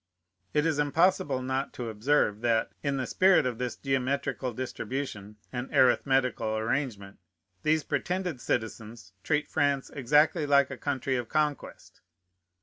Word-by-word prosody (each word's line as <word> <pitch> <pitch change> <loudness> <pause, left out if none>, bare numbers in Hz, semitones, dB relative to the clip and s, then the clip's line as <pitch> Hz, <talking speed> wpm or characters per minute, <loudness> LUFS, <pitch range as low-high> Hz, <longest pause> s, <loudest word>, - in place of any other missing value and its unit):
It 150 +1 +3
is 155 -3 +1
impossible 145 -3 +2
not 130 +1 -2
to 120 -2 -5
observe, 110 -1 +1
that, 115 -2 +1
in 140 -1 -1
the 130 - -1
spirit 185 -2 +4
of 125 -2 -2
this 125 -1 -2
geometrical 135 -1 -1
distribution 125 -3 -5 0.2
and 125 +1 -4
arithmetical 130 -4 +2
arrangement, 110 -4 -3 0.4
these 155 0 +2
pretended 175 0 -2
citizens 110 -3 -4
treat 150 -1 0
France 140 -3 0
exactly 150 +4 +2
like 140 -1 +4
a - - -4
country 135 -1 -1
of 120 -2 -4
conquest. 150 -2 -3
135 Hz, 135 wpm, -28 LUFS, 120-145 Hz, 0.4 s, spirit